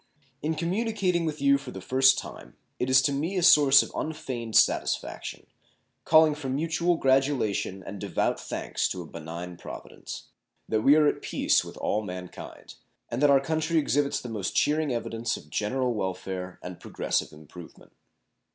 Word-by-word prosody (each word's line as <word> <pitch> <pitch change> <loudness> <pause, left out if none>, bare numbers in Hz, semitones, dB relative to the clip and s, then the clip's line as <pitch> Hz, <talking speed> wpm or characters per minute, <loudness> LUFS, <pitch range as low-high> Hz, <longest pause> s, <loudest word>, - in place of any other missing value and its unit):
In 160 +2 -1
communicating 185 -1 0
with 155 -1 -3
you 140 0 +5
for 135 -2 -9
the 95 - -7
first 130 +6 +4
time - - -8 0.2
it 125 - -1
is 130 0 +5
to 140 - +2
me 160 +8 -2
a 180 - +1
source 145 -6 +7
of - - -9
unfeigned 125 -7 -4
satisfaction, - - +1 0.6
calling 155 -1 +6
for 145 -3 -6
mutual 165 +5 +1
gratulation 130 - +1
and 100 +2 -8
devout - - -1
thanks - - -2
to 90 - -5
a - - -12
benign 85 +2 -8
Providence, - - -9 0.4
that 110 -1 0
we 135 +5 +6
are 155 -1 +5
at - - +1
peace - - +1
with - - -10
all 105 - -1
man 90 -3 -7
kind, - - -11 0.4
and 120 +3 -3
that 145 - +5
our 140 -1 +6
country 160 +3 -1
exhibits 145 -2 +1
the - - -8
most 105 -5 -4
cheering 150 -1 +2
evidence 115 -1 -2
of 75 - -15
general 125 +4 0
welfare 95 -2 -4
and 90 -1 -8
progressive - - -2
improvement. 80 +3 -14
135 Hz, 170 wpm, -27 LUFS, 100-155 Hz, 0.6 s, source